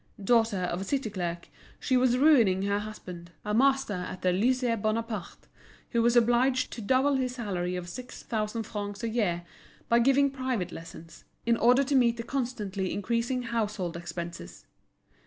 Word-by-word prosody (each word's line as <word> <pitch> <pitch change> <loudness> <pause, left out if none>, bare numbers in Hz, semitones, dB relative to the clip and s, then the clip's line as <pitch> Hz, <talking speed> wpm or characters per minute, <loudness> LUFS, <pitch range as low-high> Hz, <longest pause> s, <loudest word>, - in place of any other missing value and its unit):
Daughter 225 -2 +3
of 180 +1 -2
a - - -2
city 265 0 -2
clerk, 175 -3 -4 0.3
she 260 - 0
was 250 -1 +3
ruining 235 -10 +5
her 200 0 +1
husband, 180 -5 -8 0.2
a 210 - -1
master 270 -1 +3
at 180 0 -5
the 185 - +3
Lycée 230 +4 +1
Bonaparte, 215 -3 -3 0.5
who 235 - +2
was 235 +1 +3
obliged 245 +2 +3
to 235 - -6
double 265 +5 +2
his 255 -1 -2
salary 180 -7 -2
of 180 -1 -5
six 250 +7 -8
thousand 220 0 -2
francs 205 0 -6
a 230 - 0
year 195 -7 0 0.5
by 235 - +5
giving 275 +3 +4
private 255 -9 -2
lessons, 165 0 -11 0.2
in 235 0 +3
order 250 +4 +4
to 280 +1 -2
meet 240 -3 +4
the 230 - -4
constantly 215 -8 -3
increasing 235 +4 -1
household 210 -7 -2
expenses. 170 - -7
225 Hz, 165 wpm, -28 LUFS, 190-250 Hz, 0.5 s, ruining